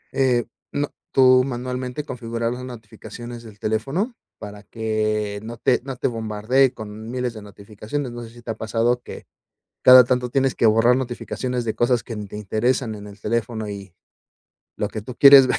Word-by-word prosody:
eh, 125 -3 +2 0.3
no, 145 0 -2 0.2
tú 130 -1 +6
manualmente 125 +1 -4
configurar 115 -3 -3
las 125 +1 -7
notificaciones 120 0 -9
del 110 -3 -13
teléfono 135 - -1 0.3
para 105 0 -9
que 110 -2 -1
no 115 +1 -7
te 125 +1 +2
no 135 -1 -5
te - - 0
bombardee 115 +3 +1
con 110 0 -8
1000 125 -2 -2
de 110 - -9
notificaciones, 105 +6 -6
no 120 0 -7
sé, 115 - -9
si 120 +1 -15
te 115 - -3
ha - - -4
pasado 115 +2 0
que - - -10 0.6
cada 125 -1 +10
tanto 125 0 0
tienes 135 +1 +1
que 115 - +4
borrar 115 +3 +5
notificaciones 125 -1 -3
de 110 - -2
cosas 120 -1 +2
que 115 - -7
ni 105 -1 -6
te 105 - -8
interesan 110 +3 0
en 105 0 -9
el 100 +1 -12
teléfono 110 0 -2
y 100 -3 -8 0.8
lo 105 - -1
que 110 0 -6
tú 120 +3 -9
quieres 140 -2 +9
ver - - +1
120 Hz, 185 wpm, -22 LUFS, 110-125 Hz, 0.8 s, cada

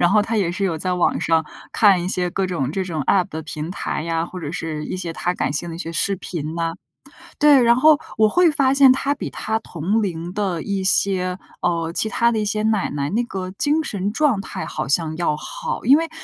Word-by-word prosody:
然 175 - +4
后 210 0 +4
她 225 +1 -2
也 185 -4 +1
是 190 +3 -2
有 165 -4 -1
在 185 +2 -1
网 180 - +1
上， 160 -1 +2 0.3
看 195 -5 +4
一 180 - -3
些 180 -1 -1
各 195 +1 -1
种 155 -6 -2
这 190 - -1
种 165 -5 -3
App 185 +5 +2
的 160 +1 -6
平 155 +1 -6
台 185 - -3
呀， 165 0 -1
或 180 +1 -8
者 150 -3 -5
是 155 -2 -4
一 - - -4
些 175 -2 -4
她 180 +2 -2
感 145 - -1
兴 170 +4 -2
的 165 - -6
一 - - -8
些 165 -2 -5
视 195 +5 +3
频 160 -3 -5
呐。 165 -1 -1 0.7
对， 295 -3 +6
然 235 0 +5
后 300 +4 +5 0.2
我 220 - +5
会 350 +9 +4
发 275 -3 +2
现 275 -2 +7
她 275 +2 +1
比 - - -6
她 220 +1 -2
同 190 +4 -2
龄 175 -3 -4
的 190 -5 -2
一 200 -2 -2
些， 185 -1 +2 0.2
呃， 165 -1 -1
其 220 - 0
她 235 +2 +2
的 220 - 0
一 210 - -1
些 215 +1 -1
奶 215 -2 +1
奶， 140 -1 -3
那 235 +4 +1
个 185 -4 -5
精 295 +10 +1
神 200 -6 -2
状 260 -7 +2
态 - - -6
好 - - -4
像 160 +2 +1
要 150 -4 0
好。 - - -5
因 270 - +7
为 330 0 -2
185 Hz, 265 characters per minute, -21 LUFS, 165-220 Hz, 0.7 s, 现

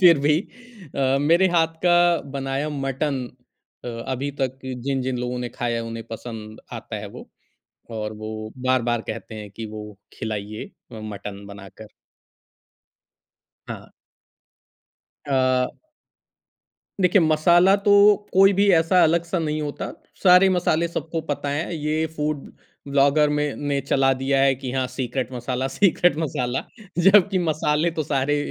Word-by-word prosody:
फिर 170 -4 +7
भी 150 +2 +3 0.6
अ, 135 0 +2
मेरे 170 +6 +4
हाथ 165 -2 +1
का 175 - +5 0.4
बनाया 135 +1 -2
मटन 135 -1 -2 0.6
अ, - - -4 0.2
अभी 135 +2 -2
तक 130 0 -1
जिन-जिन 130 0 -2
लोगों 125 0 -3
ने 125 0 -3
खाया 120 0 -3
है, 115 - -2
उन्हें 115 0 -6
पसंद 110 -1 -8
आता - - -6
है - - -6
वो, - - -12 0.6
और 110 -1 -4
वो 110 0 -7 0.2
बार-बार 120 -2 +1
कहते 110 0 -7
हैं 105 -1 -8
कि, 110 +3 -7
"वो 105 -1 -9 0.2
खिलाइए 110 -1 -4 0.3
अ, 110 - -8
मटन 100 -1 -7
बनाकर।" 100 +1 -12 1.8
हाँ। - - -8 1.4
अ 130 -2 +2 1.3
देखिए, 185 +1 +4
मसाला 170 +4 +4
तो 205 0 0 0.4
कोई 195 +1 +6
भी 200 +1 +2
ऐसा 165 +2 +4
अलग-सा 170 +2 +1
नहीं 155 -2 -2
होता। 145 -1 -5 0.3
सारे 180 0 +7
मसाले 170 -2 +1
सबको 165 0 -4
पता 145 0 -2
हैं। 150 +5 -2
ये 155 0 -1
फ़ूड 150 -1 -3 0.4
व्लॉगर 140 +2 +3
में 150 -1 -1 0.2
ने 140 - +1
चला 135 0 +2
दिया 135 0 +2
है 135 -1 +4
कि 130 -1 -6
हाँ, 130 -1 0
सीक्रेट 130 0 -4
मसाला, 125 +1 -3
सीक्रेट 175 +2 +2
मसाला, 130 -4 -2 0.4
जबकि 195 -1 +5
मसाले 155 +1 +1
तो - - +2
सारे, 140 0 0
135 Hz, 140 wpm, -23 LUFS, 120-160 Hz, 1.8 s, फिर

